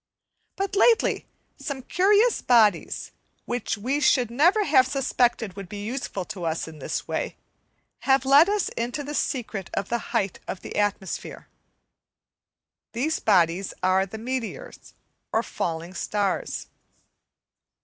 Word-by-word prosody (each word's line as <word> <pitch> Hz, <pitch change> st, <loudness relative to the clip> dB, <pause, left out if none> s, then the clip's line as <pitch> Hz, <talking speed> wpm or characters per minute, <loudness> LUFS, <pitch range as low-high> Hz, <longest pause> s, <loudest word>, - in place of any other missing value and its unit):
But 390 Hz, +1 st, -2 dB
lately, 450 Hz, +3 st, +3 dB, 0.3 s
some 275 Hz, -4 st, -5 dB
curious 415 Hz, -, +3 dB
bodies, 215 Hz, -8 st, +3 dB, 0.3 s
which 240 Hz, -2 st, -2 dB
we 260 Hz, +8 st, -1 dB
should 250 Hz, -5 st, +3 dB
have -, -, -9 dB, 0.2 s
never 310 Hz, -11 st, +5 dB
suspected 245 Hz, -5 st, 0 dB
would 195 Hz, -3 st, -8 dB
be 205 Hz, +1 st, -6 dB
useful 225 Hz, -6 st, -4 dB
to 195 Hz, -3 st, -7 dB
us 165 Hz, 0 st, -2 dB
in 160 Hz, -1 st, -11 dB
this -, -, -4 dB
way, -, -, -3 dB, 0.6 s
have 270 Hz, 0 st, +2 dB
let 285 Hz, +7 st, +7 dB
us 415 Hz, -2 st, +1 dB
into 240 Hz, +5 st, -3 dB
the 290 Hz, +1 st, -6 dB
secret 225 Hz, -10 st, -2 dB
of 195 Hz, -, -2 dB
the 235 Hz, -, 0 dB
height 205 Hz, -6 st, -1 dB
of 190 Hz, -, -5 dB
the -, -, -8 dB
atmosphere. 205 Hz, -2 st, -2 dB, 1.4 s
These 290 Hz, +7 st, 0 dB
bodies 180 Hz, -2 st, +2 dB
are 190 Hz, +1 st, +3 dB
the 220 Hz, -, -8 dB
meteors, 255 Hz, -, -6 dB, 0.4 s
or 225 Hz, -, +1 dB
falling 170 Hz, -3 st, -4 dB
stars. 200 Hz, +1 st, -2 dB
235 Hz, 130 wpm, -25 LUFS, 195-275 Hz, 1.4 s, let